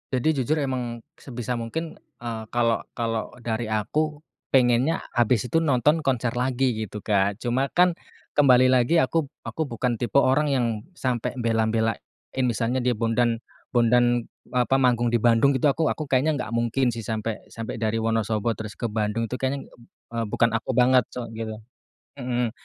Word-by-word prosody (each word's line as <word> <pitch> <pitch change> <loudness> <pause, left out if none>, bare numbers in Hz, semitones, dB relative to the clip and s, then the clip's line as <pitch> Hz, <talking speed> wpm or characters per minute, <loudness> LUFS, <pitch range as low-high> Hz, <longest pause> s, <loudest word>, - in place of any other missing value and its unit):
Jadi 135 +2 +1
jujur, 155 +6 0
emang 125 -4 -2 0.2
sebisa 125 -1 -5
mungkin, 155 +8 -4 0.2
eee, 115 -2 -5
kalau 115 -1 +1
kalau 115 -1 -3
dari 115 -1 -3
aku 150 +8 -1 0.3
pengennya 130 +4 +3 0.2
habis 120 0 +2
itu 165 +5 +1
nonton 150 +2 +2
konser 125 -3 0
lagi 125 0 +1
gitu 105 0 -7
Kak, 100 0 +1
cuma 130 +4 -1
kan 180 -1 +4 0.4
kembali 130 -3 +6
lagi 130 +6 +4
aku 160 +3 +2 0.2
aku 160 - -2
bukan 120 -3 -1
tipe 120 +4 +2
orang 140 +2 +3
yang 130 -3 +2 0.3
sampai 125 -3 -1
bela-belain, 115 -1 +1 0.5
misalnya 120 +1 0
dia 125 - +2
Bondan 115 0 +1 0.3
Bondan, 120 0 +3 0.2
apa, 125 +1 +2
manggung 125 -3 +3
di 120 - +1
Bandung 120 +4 +4
gitu 140 +3 +3
aku 160 +3 0
aku 155 - -1
kayaknya 140 +4 +3
nggak 125 -5 -4
mungkin 120 +2 +1
sih 115 - -6
sampai 110 -1 -3
sampai 115 0 -6
dari 110 0 0
Wonosobo 115 0 0
terus 110 -2 -6
ke 120 -3 -3
Bandung 110 +1 -1
tuh 125 - -3
kayaknya 135 +1 -1
ng - - -15
b - - -20 0.3
eee, 115 -1 -2
bukan 115 +3 +2
aku 115 +3 -2
banget 125 0 +4
soal 120 -2 -7
gitu. 110 -1 -5 0.6
Mhm, 125 -2 -1
120 Hz, 165 wpm, -25 LUFS, 115-130 Hz, 0.6 s, kembali